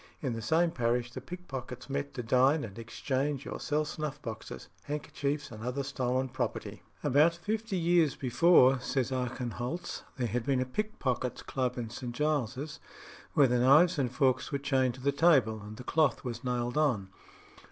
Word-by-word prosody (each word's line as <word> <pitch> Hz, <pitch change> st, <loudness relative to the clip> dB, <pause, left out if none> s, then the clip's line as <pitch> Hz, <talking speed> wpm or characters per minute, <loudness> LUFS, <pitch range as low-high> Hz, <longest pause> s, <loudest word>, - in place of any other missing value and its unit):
In 130 Hz, -5 st, -2 dB
the 115 Hz, -, -4 dB
same 165 Hz, +7 st, +2 dB
parish 120 Hz, -2 st, 0 dB
the 130 Hz, -, -7 dB
pickpockets 135 Hz, -6 st, -7 dB
met 140 Hz, +1 st, -3 dB
to 125 Hz, -, -3 dB
dine 130 Hz, +6 st, +3 dB
and 110 Hz, 0 st, -7 dB
exchange 135 Hz, +5 st, -2 dB
or -, -, -5 dB
sell 150 Hz, 0 st, 0 dB
snuff 150 Hz, -1 st, -4 dB
boxes, 115 Hz, -5 st, -7 dB, 0.2 s
handkerchiefs, 145 Hz, -1 st, -3 dB
and 110 Hz, -1 st, -8 dB
other 125 Hz, +3 st, -2 dB
stolen 130 Hz, -1 st, -1 dB
property. 125 Hz, -, -4 dB, 0.2 s
About 150 Hz, +5 st, +4 dB
fifty 215 Hz, +3 st, -2 dB
years 170 Hz, -4 st, +3 dB
before, 135 Hz, 0 st, +5 dB
says 130 Hz, 0 st, -1 dB
Archenholz, 125 Hz, +4 st, -3 dB, 0.2 s
there 125 Hz, -, 0 dB
had 120 Hz, +1 st, -1 dB
been 135 Hz, +1 st, +1 dB
a 130 Hz, -, +1 dB
pickpockets' 130 Hz, -, -2 dB
club 130 Hz, -2 st, -2 dB
in 115 Hz, -2 st, -4 dB
St. 120 Hz, 0 st, -6 dB
Giles's, 150 Hz, 0 st, -1 dB, 0.5 s
where 145 Hz, -, +6 dB
the 125 Hz, 0 st, +2 dB
knives 150 Hz, +7 st, +5 dB
and 125 Hz, -3 st, 0 dB
forks 130 Hz, -1 st, +1 dB
were 140 Hz, -, 0 dB
chained 135 Hz, -3 st, +1 dB
to 130 Hz, -, -12 dB
the 140 Hz, +2 st, +2 dB
table 135 Hz, -8 st, +3 dB
and 105 Hz, +1 st, -9 dB
the 125 Hz, -, -8 dB
cloth 155 Hz, +2 st, +2 dB
was 120 Hz, -1 st, -5 dB
nailed 125 Hz, +2 st, -1 dB
on. 115 Hz, -11 st, +1 dB
130 Hz, 175 wpm, -30 LUFS, 125-150 Hz, 0.5 s, where